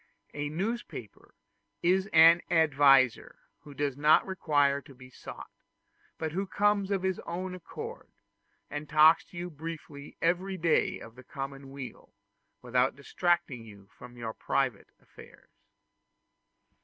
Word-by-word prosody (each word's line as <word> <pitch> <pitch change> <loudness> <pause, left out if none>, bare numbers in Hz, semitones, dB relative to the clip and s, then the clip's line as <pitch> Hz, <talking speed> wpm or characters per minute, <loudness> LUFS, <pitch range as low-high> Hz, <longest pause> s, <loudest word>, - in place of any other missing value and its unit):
A 145 0 -3
newspaper 185 - -5 0.5
is 190 +3 +2
an 165 +2 +7
adviser 140 -6 +4 0.2
who 145 -1 -14
does 145 -2 -1
not 150 +2 +4
require 145 -7 +1
to 140 -1 -16
be 130 0 -14
sought, - - -10 0.7
but 160 -1 -3
who 190 +4 -2
comes 205 0 +1
of 195 -2 -1
his 190 -1 -1
own 180 +2 -5
accord, 450 - -8 0.6
and 150 0 -6
talks 155 +1 +6
to 175 - -14
you 175 0 -5
briefly 150 -2 -9
every 185 +3 0
day 165 -2 +1
of 115 - -12
the 130 +2 -14
common 135 +1 -7
weal, 135 -6 -10 0.5
without 125 +1 +1
distracting 140 -3 -1
you 100 -3 -15
from 120 0 -13
your 115 -2 -5
private 125 -4 -1
affairs. - - -17
150 Hz, 130 wpm, -29 LUFS, 135-175 Hz, 0.7 s, an